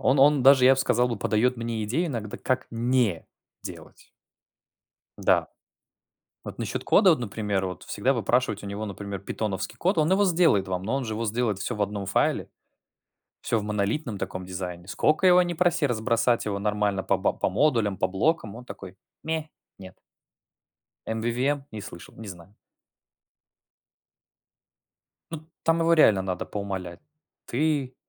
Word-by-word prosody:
он 135 +2 +2
он, 140 0 +5
даже 135 0 +7
я 135 +1 +7
б 135 - -1
сказал 125 -1 +2
бы, 120 - -2
подает 115 +5 +1
мне 115 -2 -3
идеи 150 +12 0
иногда, 115 -8 -5
как 130 0 -1
не 115 -6 0 0.4
делать. - - -11 1.2
Да, - - +3 1.0
вот - - -7
насчет - - -4
кода, 200 -2 +5
вот 160 - +4
например, 105 -4 -2
вот 90 -1 -6
всегда 130 +7 0
выпрашивать 120 -3 0
у - - -6
него, 100 +2 -4
например, 100 -1 -6
питоновский 100 0 -4
код, 185 +1 0
он 155 0 +3
его 200 +2 +4
сделает 165 - +3
вам, 90 -1 -3
но 110 +7 -1
он 135 - -1
же 110 - -3
его 115 +2 -3
сделает 110 -2 -1
всё 120 - -3
в 105 - -3
одном 100 -1 -2
файле, - - 0 0.9
всё 115 - 0
в 105 - -3
монолитном 105 +3 -2
таком 95 0 -5
дизайне, 90 -1 -6
сколько 155 - +2
его 180 0 +7
ни 175 -1 -2
проси 175 -2 +2
разбросать 115 0 +1
его 100 -2 -2
нормально 105 -1 0
по 100 - +2
б 95 - 0
по - - +1
модулям, 110 -2 +1
по 95 - 0
блокам, 105 - 0
он 120 - -10
такой: 95 -6 -10 0.3
ме, 160 -1 -3 0.3
нет. 95 -1 -12 1.1
Mvvm? 120 +6 -1
Не 110 - -6
слышал, 85 -3 -11
не 110 -2 -9
знаю. 90 +1 -11 2.8
Ну, 160 -1 -8
там 165 0 +2
его 165 0 +2
реально 110 -12 +5
надо 90 -2 -3
поумолять: 95 -4 -5 0.5
ты, 140 -1 -1
115 Hz, 160 wpm, -26 LUFS, 100-135 Hz, 2.8 s, даже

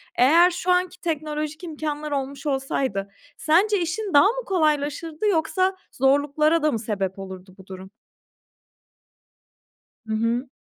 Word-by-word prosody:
Eğer 330 +8 +5
şu 355 +1 -1
anki 360 0 0
teknolojik 305 0 -3
imkânlar 305 -2 -4
olmuş 275 0 -4
olsaydı 265 -8 -2 0.3
sence 380 +5 +2
işin 375 +4 -3
daha 285 +5 +7
mı - - -2
kolaylaşırdı 310 +1 0
yoksa 370 +1 +1 0.2
zorluklara 290 +4 +2
da 305 - +3
mı 230 - -2
sebep 200 -3 -3
olurdu 190 -1 -9
bu 190 - -15
durum? 190 0 -9 2.2
Hı 220 - -2
hı. 230 +4 0
300 Hz, 125 wpm, -23 LUFS, 260-340 Hz, 2.2 s, daha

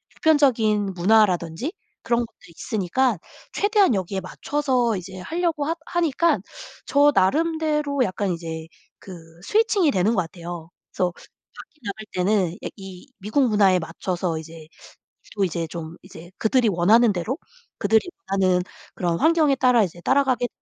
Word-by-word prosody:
보편적인 225 -10 +2
문화라든지 185 - +2 0.3
그런 235 0 +1
것도 230 - -21
있으니까 215 +6 -1 0.4
최대한 410 - +3
여기에 190 0 -2
맞춰서 250 +3 -1
이제 185 +1 -8
하려고 325 - -1
하 325 +3 -1
하니깐 335 -1 +1 0.5
저 285 0 +5
나름대로 300 - +1
약간 195 -2 -2
이제 165 -1 -6 0.3
그 190 - -11 0.3
switching이 420 -7 +2
되는 195 +4 +2
것 185 - +2
같아요. 170 -1 -8 0.2
그래서 180 -1 0
밖에 305 - -17
나갈 215 +1 -6
때는 185 -1 +1
예 - - -3
이 190 +2 -11
미국 220 +7 +1
문화에 200 -4 +4
맞춰서 175 0 -3
이제 160 0 -11 0.7
또 200 - +1
이제 170 -1 -3
좀 165 0 -7
이제 185 -2 -12
그들이 230 +1 +2
원하는 210 +5 +4
대로 195 - -3 0.4
그들이 220 0 +3 0.3
원하는 185 -2 +2 0.3
그런 170 -2 -1
환경에 315 - +3
따라 250 -3 +4
이제 175 -2 -5
따라가게 260 +1 +2
210 Hz, 335 characters per minute, -23 LUFS, 180-275 Hz, 0.7 s, 저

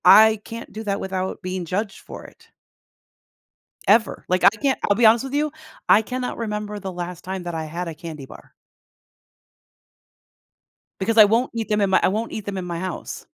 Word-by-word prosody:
I 215 +3 +8
can't 230 0 -8
do 220 +2 -6
that 200 -1 -1
without 190 0 -3
being 185 0 -3
judged 195 +4 -3
for - - -10
it. - - -17 1.4
Ever. 220 +2 +3
Like, 185 0 +1
I - - +10
can't 260 +6 -1
I'll 205 - +4
be 235 - +3
honest 225 +2 +6
with 270 0 -6
you. 300 +1 +1 0.4
I 215 - +7
cannot 250 +3 -4
remember 210 -2 -4
the 190 -1 -5
last 175 -1 -6
time 190 0 -5
that 175 -1 -5
I 160 -1 -3
had 170 +3 -5
a 165 - -6
candy 155 -3 -8
bar. - - -15 2.5
Because 225 +4 0
I 215 - +10
won't 230 +5 +2
eat 225 -1 -2
them 210 -1 +1
in 200 - +2
my 190 - +4
I - - +4
won't 220 +4 -2
eat 215 - -5
them 195 -2 -3
in 180 - -5
my 170 -1 -4
house. 185 0 -5
200 Hz, 195 wpm, -22 LUFS, 180-220 Hz, 2.5 s, I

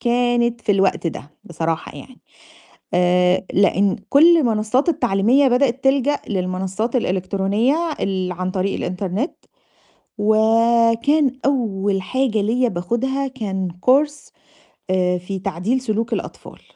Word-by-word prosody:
كانت 240 -1 +1
في 220 -3 +1
الوقت 195 -3 +1
ده 150 -2 -6
بصراحة 165 -1 -4
يعني، 255 -1 -13 0.7
آآ، 180 +1 +2
لإن 200 0 +2
كل 335 +5 +6
المنصّات 240 +2 +1
التعليمية 245 0 +2
بدأت 255 0 +1
تلجأ 275 +1 +2
للمنصّات 190 +5 -3
الإلكترونية 200 +4 0 0.2
ال 185 -2 -2
عن 185 +1 -4
طريق 190 +1 -1
الإنترنت. 190 - -3 0.9
وكان 230 +6 +3
أول 205 -8 0
حاجة 255 +1 -1
ليّا 245 +4 +1
باخُدها 235 +9 -2
كان 200 -8 -4 0.2
course 290 +3 +2 0.6
آآ، 180 -1 +1
في 190 +2 -6
تعديل 195 +7 -2
سلوك 225 -2 -2
الأطفال. - - -6
220 Hz, 110 wpm, -20 LUFS, 190-255 Hz, 0.9 s, كل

